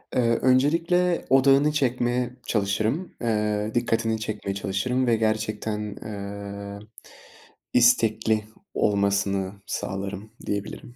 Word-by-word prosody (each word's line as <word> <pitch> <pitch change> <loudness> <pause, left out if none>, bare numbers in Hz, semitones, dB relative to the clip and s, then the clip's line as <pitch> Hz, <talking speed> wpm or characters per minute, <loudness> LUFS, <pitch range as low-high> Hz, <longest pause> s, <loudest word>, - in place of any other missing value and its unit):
Eee, 115 -2 +3
öncelikle 165 +7 +3
odağını 135 +2 +5
çekmeye 125 -3 0 0.2
çalışırım, 110 - 0
eee, 105 -2 0
dikkatini 115 -1 +1
çekmeye 105 -2 -3
çalışırım 125 +7 -1
ve 115 - +4
gerçekten, 110 -1 -1
eee, 100 -1 -6 0.9
istekli 110 -3 +3 0.3
olmasını 100 -1 +1
sağlarım 100 +2 -4
diyebilirim. 100 +4 -5
110 Hz, 90 wpm, -25 LUFS, 100-125 Hz, 0.9 s, odağını